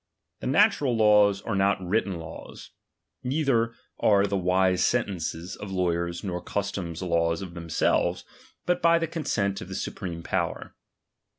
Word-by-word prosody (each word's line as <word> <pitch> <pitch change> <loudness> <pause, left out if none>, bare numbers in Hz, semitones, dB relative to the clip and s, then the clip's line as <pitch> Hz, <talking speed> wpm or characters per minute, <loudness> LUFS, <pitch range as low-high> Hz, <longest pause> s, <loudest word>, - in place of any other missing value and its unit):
The - - -4
natural 145 - +3
laws 105 -2 +4
are 115 - -3
not 100 +1 +2
written 95 0 -1
laws; 80 -1 -10 0.5
neither 125 -4 +1 0.2
are 100 -1 +4
the 100 0 -1
wise 90 0 +2
sentences 90 -6 -1
of 100 -1 -8
lawyers 85 -2 -1
nor 90 -3 -3
custom 100 -4 -3
laws 85 -1 0
of 90 -3 -8
themselves, 85 -2 0 0.4
but 180 - +1
by 170 0 +5
the 165 - 0
consent 125 - -2
of - - -7
the - - -6
supreme 85 -2 -5
power. - - -2
100 Hz, 140 wpm, -26 LUFS, 85-115 Hz, 0.5 s, by